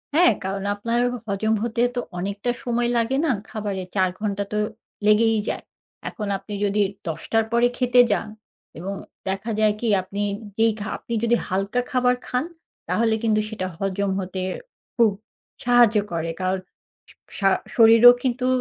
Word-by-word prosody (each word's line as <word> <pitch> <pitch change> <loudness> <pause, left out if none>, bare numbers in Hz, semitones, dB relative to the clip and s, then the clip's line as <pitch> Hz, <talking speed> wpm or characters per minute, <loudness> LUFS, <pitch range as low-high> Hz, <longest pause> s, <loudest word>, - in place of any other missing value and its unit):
হ্যাঁ, 350 +2 +6
কারণ 195 +1 -3
আপনার 230 +3 -1
হ - - -4
হজম 215 +2 0
হতে 235 0 -1
তো - - 0 0.2
অনেকটা 200 +5 -2
সময় 240 -1 0
লাগে 235 +3 +1
না, 310 - +2 0.2
খাবারে 205 -4 -4
৪ 185 -1 +3
ঘণ্টা 205 -1 -1
তো 210 - 0 0.5
লেগেই 220 +1 +4
যায়। - - -4 0.5
এখন 210 -5 -6
আপনি 210 - -10
যদি 205 +1 +1 0.3
১০:০০ 165 +7 -2
র - - -8
পরে 235 +1 +4
খেতে 250 -1 +5
যান 210 - 0 0.5
এবং 190 +3 -4 0.4
দেখা 195 +4 -3
যায় 215 -1 +4
কি? 235 - -2
আপনি 195 +2 -5 0.4
যেই 225 0 +4
খা 205 - -5
আপনি 235 - -7
যদি 235 +1 +3
হালকা 195 +5 0
খাবার 250 -1 +3
খান, 250 +5 -1 0.4
তাহলে 225 -1 +2
কিন্তু 215 -1 +2
সেটা 200 -4 -4
হজম 195 +1 -1
হতে 185 0 -4 0.5
খুব 230 -3 +4 0.5
সাহায্য 240 -3 +5
করে। 165 0 -2
কারণ, 185 +1 0 0.5
সা - - -18 0.2
সা 195 -1 +4 0.3
শরীরও 230 +1 +9
কিন্তু 250 0 0
220 Hz, 160 wpm, -23 LUFS, 195-235 Hz, 0.5 s, শরীরও